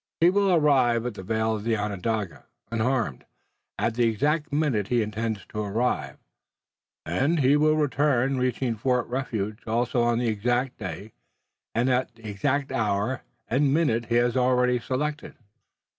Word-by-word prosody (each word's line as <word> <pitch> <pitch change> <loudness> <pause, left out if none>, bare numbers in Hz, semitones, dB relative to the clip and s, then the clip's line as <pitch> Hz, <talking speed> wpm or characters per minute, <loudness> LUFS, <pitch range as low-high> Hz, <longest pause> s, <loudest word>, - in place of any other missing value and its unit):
He 170 +2 +5
will 200 0 +2
arrive 130 -8 +3
at 125 - -2
the 100 - -8
vale 110 +3 0
of 105 +1 -6
Onondaga, 105 -2 -2 0.3
unharmed, 115 - -1 0.5
at 115 - 0
the 120 +1 +2
exact 150 +8 0
minute 140 -9 0
he 120 -1 +2
intends 110 0 -3
to 105 - -5
arrive, 110 +5 -1 0.9
and 135 - +1
he 135 +2 +4
will 155 +1 +3
return, 135 -3 +1
reaching 125 -1 0
Fort 125 +2 0
Refuge 110 -5 -3
also 120 +2 +1
on 120 0 +2
the 120 - 0
exact 120 +4 -1
day, 95 +4 -6 0.6
and 120 +3 +2
at 125 -1 0
the 115 -1 -11
exact 135 +7 -1
hour 105 +3 0 0.3
and 140 +3 +2
minute 120 -8 +1
he 120 - 0
has 120 0 +2
already 125 -1 +3
selected." 150 +5 -3
120 Hz, 150 wpm, -26 LUFS, 110-135 Hz, 0.9 s, He